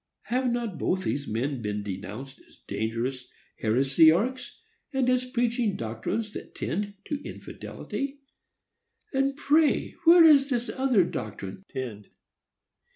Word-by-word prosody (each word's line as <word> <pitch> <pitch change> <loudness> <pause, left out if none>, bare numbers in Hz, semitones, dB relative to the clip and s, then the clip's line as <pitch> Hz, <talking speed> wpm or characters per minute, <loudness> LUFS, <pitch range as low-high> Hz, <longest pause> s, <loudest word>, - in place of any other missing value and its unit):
Have 250 0 0
not 235 -6 -2
both 185 0 0
these 145 -5 -2
men 125 +4 -2
been 105 -1 -3
denounced 105 +7 -7
as - - -23
dangerous 120 +4 -2 0.3
heresiarchs, 160 - +3 0.3
and 265 -3 +1
as 255 0 +2
preaching 240 -4 0
doctrines 115 - -3
that - - -9
tend 205 +3 -3
to 295 -1 -3
infidelity? 275 0 -6 0.9
And 275 +1 +1
pray 300 +1 +3
where 335 +1 +9
does 290 -3 +7
this 245 -2 -1
other 260 -7 +3
doctrine 105 - -5
tend? 110 -6 -6
200 Hz, 120 wpm, -27 LUFS, -, 0.9 s, where